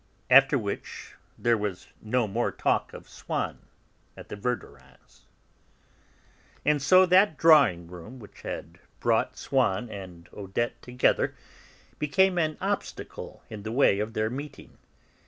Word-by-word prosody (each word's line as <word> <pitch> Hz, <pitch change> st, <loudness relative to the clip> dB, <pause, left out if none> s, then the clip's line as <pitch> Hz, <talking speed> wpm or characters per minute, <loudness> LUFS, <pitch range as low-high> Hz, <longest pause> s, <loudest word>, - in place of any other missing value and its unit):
After 135 Hz, +2 st, +7 dB
which 100 Hz, -5 st, -6 dB, 0.2 s
there 120 Hz, -2 st, +2 dB
was 100 Hz, -3 st, -4 dB
no 115 Hz, +1 st, 0 dB
more 115 Hz, +4 st, -1 dB
talk -, -, 0 dB
of -, -, -11 dB
Swann -, -, -4 dB, 0.6 s
at -, -, -12 dB
the -, -, -5 dB
Verdurins'. 120 Hz, +4 st, -7 dB, 1.4 s
And 150 Hz, -1 st, +2 dB
so 185 Hz, +6 st, +6 dB
that 185 Hz, -2 st, +4 dB
drawing 140 Hz, -, +5 dB
room 90 Hz, +8 st, -11 dB
which 105 Hz, -5 st, -14 dB
had -, -, -7 dB, 0.2 s
brought -, -, +1 dB
Swann 120 Hz, -4 st, 0 dB
and 90 Hz, -4 st, -9 dB
Odette 120 Hz, +4 st, -3 dB
together 125 Hz, 0 st, +1 dB, 0.6 s
became 180 Hz, +5 st, +2 dB
an 155 Hz, -2 st, 0 dB
obstacle -, -, -5 dB
in 110 Hz, -2 st, -8 dB
the 110 Hz, +2 st, -5 dB
way 115 Hz, -5 st, +3 dB
of 110 Hz, +2 st, -3 dB
their 110 Hz, 0 st, -1 dB
meeting. 140 Hz, +3 st, -9 dB
120 Hz, 130 wpm, -27 LUFS, 105-145 Hz, 1.4 s, After